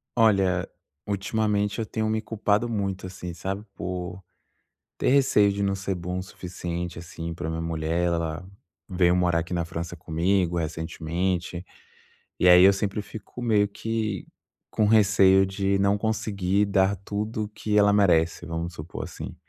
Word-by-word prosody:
Olha, 95 -5 +3 0.4
ultimamente 105 +1 0
eu 115 - -1
tenho 110 0 -2
me 110 0 0
culpado 110 0 0
muito, 100 -4 -2
assim, 90 -1 -7
sabe, 95 +4 -4
por 90 0 -5 0.8
ter - - +1
receio 125 -7 +4
de 100 +1 -3
não 100 0 +1
ser 95 0 -3
bom 90 +1 -4
o - - -3
suficiente, 85 -2 -6
assim, 85 0 -6
pra 80 - -5
minha 80 0 -3
mulher, 80 +1 -1
ela 85 +1 -2 0.4
veio 90 -1 +3
morar 90 -2 +2
aqui 85 +2 -7
na 85 -1 0
França 85 +1 -6
comigo, 85 +2 0
recentemente, 85 +2 -3 0.8
e 90 - +4
aí 90 0 +9
eu 100 +1 +7
sempre 100 +1 -2
fico 110 +3 -10
meio 105 -4 +3
que 110 -2 -3 0.4
com 110 - +1
receio 100 -3 +5
de 95 0 0
não 100 +1 +3
conseguir 100 -2 0
dar 100 0 +2
tudo 105 +3 -3
o - - -4
que 105 0 -1
ela 105 0 +5
merece 90 -5 +3
vamos 85 +1 -4
supor 80 +1 -7
assim. - - -8
95 Hz, 155 wpm, -25 LUFS, 85-105 Hz, 0.8 s, aí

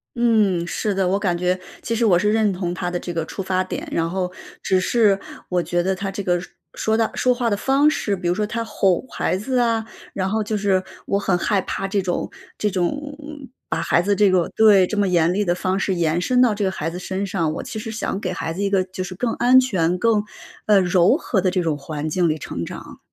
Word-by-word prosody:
嗯， 215 -7 +2
是 210 +4 -1
的。 190 -1 +1
我 190 +2 +2
感 195 -4 0
觉 180 +1 0 0.2
其 230 - -2
实 230 +1 +1
我 180 -5 +4
是 210 +3 +2
认 215 -2 +2
同 180 -1 -3
他 180 0 -3
的 175 - -2
这 175 - -6
个 165 -1 -2
出 195 - -6
发 185 0 0
点， 185 - -6
然 165 0 0
后 180 +1 -2 0.3
只 190 - +2
是 205 0 +3 0.3
我 180 -1 +1
觉 175 +2 0
得 190 +2 0
他 195 +1 -4
这 200 - -4
个 175 -2 +1
说 190 - -11 0.2
说 220 - 0
到 225 -1 +2
说 255 - +3
话 240 -1 -1
的 205 - 0
方 275 +6 +3
式， 210 -9 -1
比 180 -2 -4
如 175 - +2
说 210 +2 0
他 230 +2 -3
吼 195 -5 +1
孩 - - -1
子 250 +7 -2
啊， 230 -2 +2 0.3
然 190 -1 -1
后 220 +2 0
就 215 +1 -2
是 195 -2 +1 0.2
我 200 - +1
很 195 -2 +1
害 195 +3 +1
怕 195 - -3
这 200 +1 0
种 180 -2 -2 0.3
这 210 - +1
种， 180 -3 0 0.3
嗯， 290 -3 -10 0.2
把 - - -1
孩 170 - +2
子 205 +2 +1
这 205 0 +4
个 185 -2 +2
对， 210 -4 +6
这 210 - -4
么 200 - +2
严 175 -1 +2
厉 205 +2 +1
地 175 -3 +1
方 185 +1 -1
式 190 -1 0
延 170 0 +1
伸 250 +7 +1
到 235 -4 +3
这 205 0 -2
个 190 - +2
孩 165 -3 -3
子 180 - -6
身 190 +2 -3
上。 165 -4 -1
我 - - -5
其 220 - -6
实 220 - -6
想 220 -3 -3
给 185 -3 -3
孩 165 -2 -3
子 185 - -5
一 200 - +1
个 195 -2 +2
就 185 0 -6
是 185 0 -7
更 230 +4 -1
安 255 +1 +5
全 180 -9 +1
更， 215 +1 +2 0.4
呃， 210 -2 +6
柔 180 - +4
和 220 - -1
的 185 - +2
这 180 0 0
种 160 -3 0
环 145 +1 -5
境 170 +2 +1
里 155 - 0
成 150 - -5
长。 - - -9
190 Hz, 275 characters per minute, -21 LUFS, 180-215 Hz, 0.4 s, 对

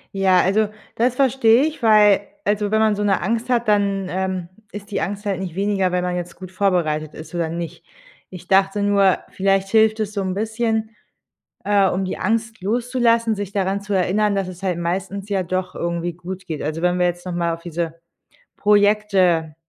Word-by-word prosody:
Ja, 190 -2 +4
also 210 +2 +2 0.3
das 245 +2 +1
verstehe 260 -2 +4
ich, 305 -5 -5
weil 210 -2 +5 0.2
also 205 0 0
wenn 220 - +3
man 215 -1 +3
so 205 - -2
'ne 200 -1 +1
Angst 230 +6 -2
hat, 240 -2 +1
dann, 200 -2 +1
ähm, 185 -2 -3 0.2
ist 205 +1 -9
die - - -1
Angst 205 +1 -4
halt 195 -3 -1
nicht 180 -3 -5
weniger, 195 -2 0
wenn 180 0 0
man 180 0 -2
jetzt 175 -1 -5
gut 185 0 -10
vorbereitet 170 -6 0
ist 160 +2 -11
oder 165 -2 -1
nicht. 170 0 -6 0.5
Ich 180 -1 -11
dachte 195 +2 +3
nur, 200 -2 +3
vielleicht 195 0 +1
hilft 220 0 +3
es 210 -1 -2
so 200 - -2
'n 185 -1 -2
bisschen, 220 +1 -2 0.7
äh, 200 -1 +3
um 190 +2 -1
die - - -4
Angst 225 +2 -1
loszulassen, 235 +1 +1
sich 200 -1 -5
daran 195 0 -1
zu 205 0 -6
erinnern, 200 +3 +1
dass 195 -2 -1
es 185 +1 -10
halt 180 -3 -1
meistens 190 +3 -3
ja 195 -2 0
doch 185 +1 -3
irgendwie 170 0 -3
gut 185 +1 -8
geht. 155 -3 -4
Also, 155 +2 -3
wenn 180 0 +1
wir 180 - +3
jetzt 175 +1 -3
noch 180 - -4
mal 170 -1 0
auf 165 - -6
diese 170 -1 -4 0.6
Projekte, 205 -6 +2
195 Hz, 200 wpm, -21 LUFS, 180-210 Hz, 0.7 s, weil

